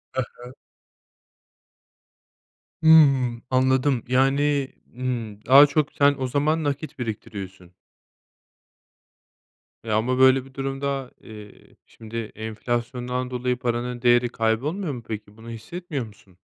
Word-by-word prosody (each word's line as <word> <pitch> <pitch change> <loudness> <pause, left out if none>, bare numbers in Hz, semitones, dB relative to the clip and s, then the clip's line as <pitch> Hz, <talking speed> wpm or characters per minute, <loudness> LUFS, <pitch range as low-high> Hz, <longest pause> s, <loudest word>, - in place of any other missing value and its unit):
He 130 - +1 0.2
he. 125 - -10 2.3
Hımm, 135 -7 +5
anladım. 130 0 +2
Yani, 135 +2 +1 0.2
ımm, 115 -5 -4
daha 140 +3 +8
çok 150 0 0
sen 145 0 +3
o 130 - -1
zaman 150 +5 0
nakit 145 0 -4
biriktiriyorsun. 95 -5 -7 2.1
E, 110 - -5
ama 115 +4 +1
böyle 130 0 +5
bir 135 - -17
durumda, 135 -1 -3
eee, 105 -2 -14
şimdi 115 +1 -10 0.2
enflasyondan 120 +3 -3
dolayı 125 0 -1
paranın 120 0 -3
değeri 120 0 +4
kaybolmuyor 140 - -1
mu 120 - -8
peki, 105 -1 -7
bunu 115 +1 -11
hissetmiyor 140 +4 -6
musun? 100 -3 -19
125 Hz, 110 wpm, -24 LUFS, 115-135 Hz, 2.3 s, daha